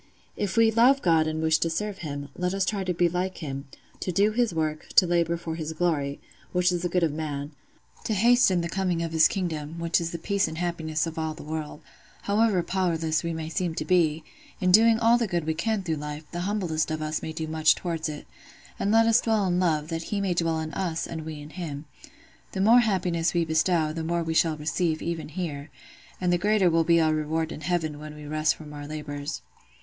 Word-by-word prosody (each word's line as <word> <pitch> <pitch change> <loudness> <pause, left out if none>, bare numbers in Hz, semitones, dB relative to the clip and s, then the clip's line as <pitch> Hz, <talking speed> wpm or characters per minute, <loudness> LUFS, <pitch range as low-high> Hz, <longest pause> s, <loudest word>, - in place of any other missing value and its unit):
If 200 -1 -3
we 225 -1 +5
love 250 +5 +4
God 160 -3 +3
and 155 0 -2
wish 160 0 +3
to 165 - +1
serve 200 +4 -3
Him, 145 -3 -5
let 180 +1 -1
us 195 -1 +1
try 200 0 -1
to 185 - 0
be 175 0 +2
like 180 +2 -2
Him, 140 -3 -6 0.3
to 185 - -2
do 200 +4 +3
His 235 -1 +1
work, 155 -2 -2
to 185 - +7
labour 170 -1 +1
for 165 -1 -5
His 160 -1 -4
glory—which 170 +2 -1
is 175 -1 -1
the 175 - -1
good 180 0 +1
of 160 -3 +1
man—to 150 - -6
hasten 225 -4 +4
the 170 - -2
coming 180 -2 -1
of 165 - -3
His 160 -1 +6
kingdom, 165 -4 -4
which 170 0 +1
is 165 - -2
the 170 - -5
peace 200 +3 0
and 160 - -6
happiness 160 -3 -1
of 165 0 -5
all 160 -1 -2
the 160 - -10
world: 155 0 -5 0.4
however 205 -3 +2
powerless 165 -4 0
we 170 - -2
may 160 -1 -4
seem 170 0 -2
to - - -3
be, 165 -4 +2 0.4
in 185 -3 +2
doing 225 +3 +6
all 235 +1 +4
the 230 - 0
good 175 -4 -1
we 160 - 0
can 215 +5 -1
through 160 -3 -2
life, 150 +1 -6
the 175 - -4
humblest 175 -7 -1
of 155 0 -2
us 155 +1 -2
may 160 - -5
do 160 0 -4
much 155 0 +3
towards 165 -3 -3
it: 150 -1 -7 0.5
and 200 - +1
let 225 +1 +5
us 230 +1 +4
dwell 220 -3 +1
in 180 -1 +1
love, 155 -4 +1
that 165 0 -3
He 205 - -1
may 195 -2 0
dwell 165 -2 0
in 155 0 -5
us 170 -4 -2
and 160 -1 -6
we 155 -2 -6
in 145 +1 -10
Him. 155 -5 -6 0.7
The 190 - -3
more 230 +5 +7
happiness 180 -7 0
we 170 -1 +2
bestow, 160 0 +1
the 165 0 -4
more 170 +1 -1
we 160 0 -2
shall 160 -1 +2
receive, 160 +1 -1
even 165 -2 -3
here; 155 -3 -5 0.5
and 180 -1 +1
the 175 - +2
greater 205 -2 +3
will 165 0 +3
be 170 +1 +4
our 160 -1 +3
reward 155 +1 -1
in - - -7
heaven 160 -2 -1
when 150 0 -9
we 150 0 -10
rest 155 +1 +1
from 150 -2 -11
our 145 0 -7
labours. 150 0 -5
165 Hz, 230 wpm, -26 LUFS, 155-185 Hz, 0.7 s, to